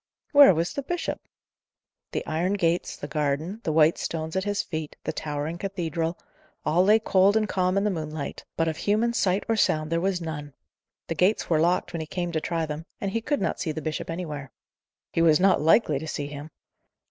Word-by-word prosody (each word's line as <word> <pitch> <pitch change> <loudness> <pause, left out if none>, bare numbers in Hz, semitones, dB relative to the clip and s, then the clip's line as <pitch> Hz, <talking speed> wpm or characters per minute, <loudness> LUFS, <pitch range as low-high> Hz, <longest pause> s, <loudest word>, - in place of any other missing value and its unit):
Where 285 - +8
was 165 +2 -1
the 280 - -2
bishop? 350 +5 -3 0.9
The - - -3
iron 175 +5 0
gates, 175 -3 0
the 145 - -7
garden, 150 +8 -2
the 160 - 0
white 155 +1 +4
stones 160 0 -3
at 190 +1 0
his 205 0 0
feet, 155 -3 -5
the - - -2
towering 150 +2 -4
cathedral, 170 -4 -2 0.5
all 175 +4 +3
lay 210 +3 +6
cold 200 -1 +3
and 215 -1 +1
calm 185 -1 +1
in 200 - +2
the 210 - +1
moonlight, 155 -4 -5
but 165 - +2
of 160 -1 -2
human 220 +3 +1
sight 190 -3 +1
or 225 - +2
sound 155 -7 +1
there 165 0 +1
was 190 -1 0
none. 150 -4 -6 0.5
The - - -1
gates 180 +4 +1
were 160 - +4
locked 175 +3 +1
when 170 - -3
he 155 - -6
came 175 +1 -3
to 160 -2 -1
try 165 -1 -1
them, 155 +2 -6
and 195 - -2
he 230 - -1
could 290 +5 -1
not - - -1
see 160 - -1
the 155 - -4
bishop 155 +1 -4
anywhere. 150 -6 -5 0.6
He 165 - +2
was 160 -1 +5
not 190 -3 +4
likely 155 -2 +4
to 160 - -7
see 145 -2 -3
him. 145 +1 -8
165 Hz, 210 wpm, -26 LUFS, 155-195 Hz, 0.9 s, Where